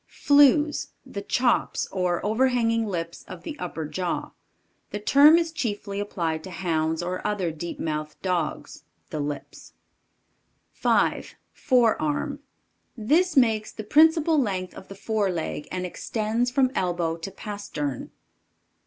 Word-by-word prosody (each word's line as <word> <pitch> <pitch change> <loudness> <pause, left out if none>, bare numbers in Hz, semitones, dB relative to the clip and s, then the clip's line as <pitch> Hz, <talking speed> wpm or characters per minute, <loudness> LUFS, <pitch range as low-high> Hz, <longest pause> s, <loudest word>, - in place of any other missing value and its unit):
Flews. 290 +1 +3
The 205 -7 -6
chops, 240 +4 +1
or 180 -2 -1
overhanging 230 0 +2
lips 170 -3 -4
of 180 -2 -9
the 300 - -6
upper 165 -3 -4
jaw. 180 +3 -3 0.6
The - - -4
term 285 +9 +7
is 335 -1 0
chiefly 205 -9 -3
applied 165 -6 -2
to - - -7
hounds 160 -2 -1
or 180 +1 -3
other 195 -5 -1
deep 165 +2 -6
mouthed 155 -1 -4
dogs. 180 -3 -2 0.3
The 155 - -3
lips. 145 0 -6 1.0
5. - - +1 0.2
FOREARM. 245 - +1 0.6
This 305 +9 +2
makes 220 -4 +3
the 215 - -7
principal 315 +5 +4
length 190 -7 -2
of 190 - -11
the 195 - -10
fore 210 0 -1
leg 165 -4 -4
and 185 0 -3
extends 220 +6 -1
from 255 0 +2
elbow 175 -6 -1
to 165 +4 -6
pastern. 195 - -5
205 Hz, 130 wpm, -25 LUFS, 170-250 Hz, 1.0 s, term